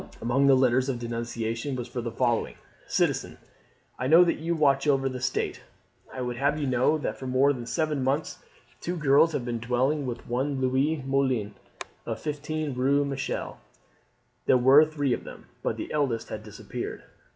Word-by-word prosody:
Among 135 +4 +2
the 135 - +7
letters 130 0 +3
of 130 - -1
denunciation 115 +2 -3
was 125 -1 -4
the 120 -1 -3
following: 120 0 0 0.3
"Citizen, - - 0 0.6
I 130 - -1
know 165 +5 +8
that 170 - 0
you 170 +2 -1
watch 140 -2 +2
over 135 -2 +3
the 130 -1 -4
state. 130 -1 -2 0.5
I 130 - -6
would 125 -1 -3
have 145 +3 +1
you 145 - -1
know 130 +4 +2
that 150 - -4
for 130 - -6
more 135 +3 +3
than 120 -3 -7
seven 155 -1 -1
months 140 +4 -1 0.4
two 175 +1 -3
girls 150 +2 +4
have 125 - -2
been 120 -1 -2
dwelling 130 +5 0
with 120 -1 -6
one 130 +3 -1
Louise 135 +3 +1
Moulin 130 -6 0 0.5
of - - -3
15 150 0 -3
Rue 140 +3 +2
Michel; 135 -1 -4 0.9
there 130 - +6
were 135 +5 +7
three 145 -4 -1
of - - -3
them, - - -11 0.2
but - - -2
the - - -6
eldest 135 -7 -1
has 110 - -5
disappeared. 105 -1 -7
135 Hz, 175 wpm, -27 LUFS, 125-145 Hz, 0.9 s, know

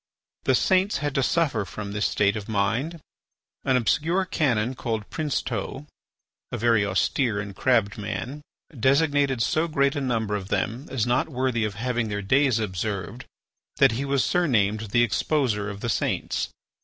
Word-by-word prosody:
The - - +4
saints 190 +1 +2
had 145 -2 -2
to 135 - +1
suffer 140 -6 +1
from 100 +1 -7
this 105 0 0
state 100 0 +2
of 105 0 -6
mind. 115 +11 0 0.6
An 130 -2 +3
obscure 160 - +1
canon 125 -9 +1
called 110 -4 -3
Princeteau, 135 -4 -3 0.7
a - - -2
very 115 -2 +3
austere 100 +3 +1
and 100 -1 -6
crabbed 110 -3 +1
man, 125 +7 -4 0.3
designated 140 0 +2
so 155 +8 +1
great 140 -2 +1
a 145 - -1
number 115 -5 0
of 95 -2 -4
them 120 +8 -2
as 130 -5 0
not 120 +5 +1
worthy 125 -4 0
of 105 -2 -4
having 120 0 -1
their 105 0 -3
days 130 +3 +3
observed, 100 -2 -3 0.5
that - - +5
he 120 +5 -2
was 140 -1 +1
surnamed 110 - +1
the 120 +3 +4
exposer 115 -3 0
of 100 -1 -7
the 120 - -2
saints. - - -1
120 Hz, 160 wpm, -25 LUFS, 105-140 Hz, 0.7 s, that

